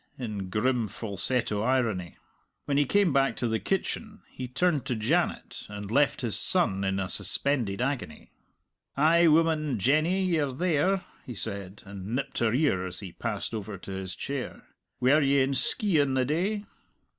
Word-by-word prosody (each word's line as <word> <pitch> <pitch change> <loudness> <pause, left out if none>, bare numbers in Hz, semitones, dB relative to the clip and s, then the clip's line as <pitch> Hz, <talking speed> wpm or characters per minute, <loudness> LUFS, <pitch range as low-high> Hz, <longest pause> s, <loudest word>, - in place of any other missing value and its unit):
in 105 -7 -5
grim, 115 +3 0
falsetto 105 +1 0
irony. 115 -8 -1 0.5
When 140 - -1
he 145 - +3
came 195 +1 +2
back 135 -4 +2
to 120 - -2
the 110 -1 -1
kitchen 215 - -3
he 130 - -6
turned 150 +3 0
to 125 - -1
Janet, 110 0 -1
and 100 0 -7
left 140 +3 +2
his 115 -4 +5
son 100 - +3
in 95 0 -1
a 95 - -2
suspended 110 +2 0
agony. 135 - -4 0.7
"Ay, 165 +4 +4
woman, 155 -4 +2
Jenny, 155 - +2
ye're 155 -7 0
there!" 180 +5 +1 0.2
he 125 - -8
said, 100 -2 -4
and 100 +3 -6
nipped 135 - -3
her 115 -2 +2
ear 125 - +1
as 90 +2 -4
he 95 -3 -8
passed - - -4
over 105 -2 -5
to 95 - -10
his 95 -1 -4
chair. 135 +2 -5 0.4
"Were 140 +5 +4
ye 140 0 +3
in 135 +1 +1
Skeighan 150 - +2
the 130 -1 +2
day?" 190 - -1
130 Hz, 165 wpm, -27 LUFS, 105-155 Hz, 0.7 s, his